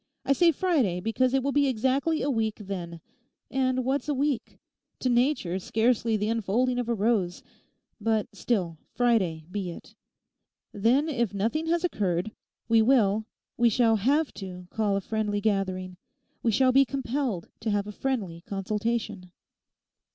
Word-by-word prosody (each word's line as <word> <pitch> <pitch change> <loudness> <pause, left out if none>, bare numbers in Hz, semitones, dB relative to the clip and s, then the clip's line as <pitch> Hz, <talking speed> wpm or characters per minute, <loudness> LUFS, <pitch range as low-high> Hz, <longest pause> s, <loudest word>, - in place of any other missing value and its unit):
I 275 - +4
say 335 +4 +5
Friday 275 - +1
because 225 +6 +1
it 265 - +1
will 280 - 0
be 285 0 +3
exactly 265 +6 +1
a 285 - 0
week 220 -3 0
then. 180 -5 -6 0.5
And 255 -1 0
what's 275 +3 -1
a 290 - +1
week?—to 265 -1 -4
Nature 240 - +1
scarcely 225 +2 +1
the 210 +1 -1
unfolding 230 +3 +1
of 240 -1 -3
a 235 - +1
rose. 200 -5 0 0.6
But 220 -1 0
still, 180 -9 -1 0.2
Friday 190 -10 +1
be 195 -3 -3
it. 170 - -10 0.8
Then, 240 +9 +2
if 235 -9 -1
nothing 235 +11 -1
has 340 +1 +1
occurred, 195 - -1 0.4
we 225 -1 +5
will, 220 -3 +3 0.3
we 235 0 +4
shall 225 0 +3
have 285 +8 +1
to 180 -1 -7
call 210 -2 0
a - - -2
friendly 210 0 -1
gathering, 185 -3 -1 0.4
we 235 - +1
shall 255 +4 +4
be 270 +2 +6
compelled 265 -7 -3
to 225 - -3
have 205 -1 0
a 210 - -6
friendly 205 -9 -3
consultation. 210 -1 -3
225 Hz, 150 wpm, -27 LUFS, 200-260 Hz, 0.8 s, be